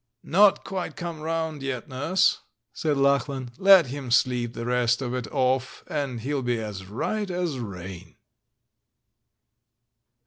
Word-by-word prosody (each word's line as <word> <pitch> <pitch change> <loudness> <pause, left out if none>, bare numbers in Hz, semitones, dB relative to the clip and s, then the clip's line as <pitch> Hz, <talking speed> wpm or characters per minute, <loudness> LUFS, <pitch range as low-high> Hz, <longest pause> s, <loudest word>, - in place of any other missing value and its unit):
'* - - -51
"Not 200 +3 +4
quite 190 -2 -4
come 170 -2 -5
round 160 -2 -2
yet. 135 0 -4
Nurse," 145 +7 +2 0.3
said 150 -3 -1
Lachlan; 140 -2 +1
"let 195 -3 +8
him 135 0 -6
sleep 120 -1 +2
the 115 - -5
rest 120 -1 +2
of 125 -2 -3
it 125 -3 -3
off, 130 -1 0
and 140 -6 -3
he'll 140 +3 -2
be 120 -2 -1
as 100 -4 -6
right 200 - -2
as 175 -6 -2
rain!" 95 -5 -8
135 Hz, 140 wpm, -25 LUFS, 120-160 Hz, 0.3 s, let